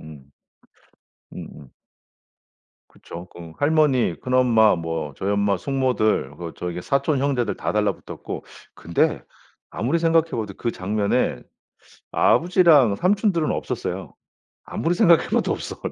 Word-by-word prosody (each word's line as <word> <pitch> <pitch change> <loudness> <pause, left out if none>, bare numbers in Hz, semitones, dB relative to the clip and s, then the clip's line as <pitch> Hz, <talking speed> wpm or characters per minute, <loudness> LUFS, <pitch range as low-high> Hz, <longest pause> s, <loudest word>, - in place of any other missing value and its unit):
음. 75 -3 -13 1.0
음음. 70 - -10 1.2
그쵸. 85 +2 -11
그 85 -2 -11
할머니, 145 - +2
큰엄마, 120 -6 +3
뭐 80 -4 -4
저희 100 - -2
엄마, 100 -1 +1
숙모들 125 - 0
그 85 0 -7
저기 90 0 -5
사촌 140 - 0
형제들 130 -6 0
다 - - -3
달라 105 -2 +1
붙었고 - - -8 0.3
근데 85 +1 0 0.5
아무리 135 +10 -1
생각해봐도 165 - 0
그 120 - -1
장면에 100 +1 -1 0.7
아버지랑 165 - +4
삼촌들은 185 - +1
없었어요. - - -4 0.5
아무리 165 - -1
생각해 170 -1 +4
봐도 - - +1
없어 - - -6
내가. - - -4
115 Hz, 270 characters per minute, -22 LUFS, -, 1.2 s, 아버지랑